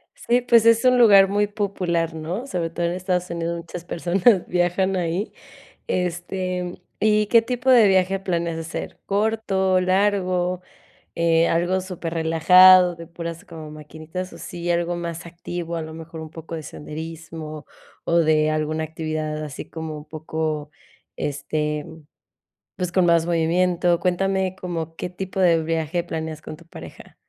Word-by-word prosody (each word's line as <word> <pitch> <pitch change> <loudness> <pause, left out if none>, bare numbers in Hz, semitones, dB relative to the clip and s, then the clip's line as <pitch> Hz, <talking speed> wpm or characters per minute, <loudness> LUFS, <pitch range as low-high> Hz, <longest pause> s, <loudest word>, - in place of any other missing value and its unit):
Sí, 245 +1 +1
pues 235 -2 +4
es 230 +1 +5
un 250 0 +5
lugar 200 -5 +7
muy 205 +1 +1
popular, 180 -5 -1
¿no? 170 +10 -4
Sobre 170 -7 -2
todo 170 +1 -2
en 170 - 0
Estados 180 -1 -2
Unidos, 170 0 -3
muchas 170 +1 -8
personas 180 +4 +2
viajan 180 +2 +1
ahí. 180 +3 -2 0.6
Este, 180 0 -2 0.3
¿y 210 0 +3
qué 230 0 +6
tipo 250 +2 -2
de 235 -5 +7
viaje 190 0 +2
planeas 170 -3 -2
hacer? 165 +1 -6
¿Corto, 200 -3 +1
largo, 185 -2 +1 0.5
eh, 165 0 +3
algo 175 +3 +1
superrelajado, 180 +1 +5
de 165 0 -10
puras 170 +2 -7
como 160 -4 -10
maquinitas 155 +4 -8
o - - -11
sí, 175 -2 -5
algo 175 0 0
más 170 0 -5
activo, 170 0 -6
a 165 - -3
lo 160 0 -8
mejor 160 0 -9
un 155 -1 -8
poco 165 0 -9
de 160 - -5
senderismo, 155 0 -8 0.4
o 170 - +1
de 155 -1 +3
alguna 155 +1 -1
actividad 155 -1 -4
así 145 -1 -8
como 160 -1 -6
un 150 - -10
poco, 155 -1 -4 0.5
este, 150 +1 -2 0.9
pues 180 -1 -3
con 185 -2 +3
más 170 -1 +4
movimiento? 175 +1 +2
Cuéntame 190 +1 0
como 165 -3 -4
qué 180 - -4
tipo 190 +1 -5
de 165 -3 +4
viaje 165 +1 -1
planeas 160 -2 -5
con 155 - -8
tu 170 +1 -18
pareja. - - -12
170 Hz, 150 wpm, -23 LUFS, 160-185 Hz, 0.9 s, lugar